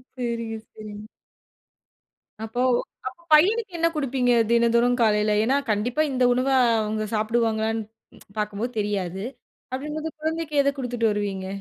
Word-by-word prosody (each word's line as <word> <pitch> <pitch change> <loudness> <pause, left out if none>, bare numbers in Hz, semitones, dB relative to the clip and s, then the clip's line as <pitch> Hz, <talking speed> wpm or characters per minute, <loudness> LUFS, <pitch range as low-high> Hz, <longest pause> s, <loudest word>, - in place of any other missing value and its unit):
சரிங்க, 235 -2 -3
சரிங்க. 215 0 -10 1.4
அப்போ! 225 +2 -5 0.5
அப்போ 260 +6 -8
பையனுக்கு 405 +7 +4
என்ன 335 0 +3
கொடுப்பீங்க? 260 -4 +1 0.2
தினந்தோறும் 235 +1 +3
காலையில 210 -1 +3
ஏன்னா 265 +5 +2
கண்டிப்பா 240 +8 0
இந்த 255 -1 +1
உணவ 255 +2 0 0.3
அவுங்க 215 0 -2
சாப்பிடுவாங்களான்னு 225 0 0 0.5
பார்க்கும்போது 210 +3 -2
தெரியாது. 195 -3 -2 0.5
அப்பிடிங்கம்போது 300 +4 -4
குழந்தைக்கு 320 -1 -2
எத 280 - +3
கொடுத்துட்டு 245 -3 0
வருவீங்க? 200 -2 -3
235 Hz, 115 wpm, -24 LUFS, 215-270 Hz, 1.4 s, பையனுக்கு